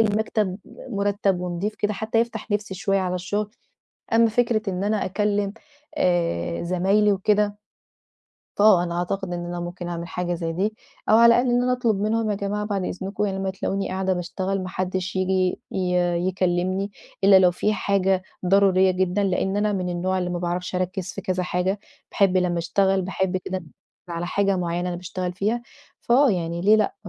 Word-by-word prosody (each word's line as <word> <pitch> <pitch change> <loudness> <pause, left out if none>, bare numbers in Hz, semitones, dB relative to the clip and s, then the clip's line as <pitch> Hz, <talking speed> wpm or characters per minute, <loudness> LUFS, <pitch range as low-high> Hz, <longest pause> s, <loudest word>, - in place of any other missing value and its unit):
المكتب 210 -2 +1 0.3
مُرتب 200 -3 0
ونضيف 180 +4 -3
كده 210 0 -1
حتى 220 +3 0
يفتح 230 -1 -4
نفسي 205 -1 -1
شوية 195 +1 0
على 180 -1 -1
الشغل. 205 +4 -2 0.6
أمّا 230 0 +5
فكرة 230 -1 +1
إن 185 +1 -2
أنا 210 0 0
أكلّم 205 +1 0 0.5
آآ 125 - 0
زمايلي 195 +4 +2
وكده 205 +1 +1 1.0
آه 205 -5 +6
أنا 170 0 -3
أعتقد 180 +1 -2
إن 175 0 -3
أنا 175 0 -4
ممكن 175 0 -6
أعمل 170 0 -5
حاجة 175 -1 -2
زي 165 -1 -3
دي 205 +6 -1 0.3
أو 220 - +6
على 235 - +7
الأقل 245 +1 +2
إن 245 0 +3
أنا 250 0 +2
أطلب 230 -5 +1
منهم 215 +1 0
يا - - +1
جماعة 200 +1 -2
بعد 200 -3 -2
إذنكم 195 +3 -3
لمّا 195 -1 -2
تلاقوني 195 +1 -2
قاعدة 190 0 -1
باشتغل 185 +2 -2
ما 185 - -5
حدش 185 +1 -3
ييجي 185 -1 +1
ي 180 -1 0 0.3
يكلمني 185 +2 0 0.3
إلا 195 -1 +8
لو 185 -1 +5
في 210 +4 0
حاجة 195 -2 +1 0.2
ضرورية 190 0 +4
جدًًا 185 +2 0
لأن 190 +1 0
أنا 210 0 +1
من 185 -2 -2
النوع 185 +2 -1
اللي 180 -1 -2
ما 175 - -2
باعرفش 180 +1 -3
أركِّز 185 0 -2
في 195 - -6
كذا 185 -1 -1
حاجة، 180 +3 -1 0.3
باحب 190 -2 +3
لمّا 180 -2 +1
أشتغل 190 +3 +1
باحب 190 0 -1
كده 185 0 -4 0.4
على 170 0 -3
حاجة 195 +1 +1
معيّنة 175 0 -1
أنا 175 - -3
باشتغل 180 0 -4
فيها. 215 +6 -1 0.4
فآه 255 +2 +4
يعني 170 -2 -2
ليه 210 +4 +5
لأ؟ 215 -2 +1
190 Hz, 175 wpm, -24 LUFS, 180-205 Hz, 1.0 s, إلا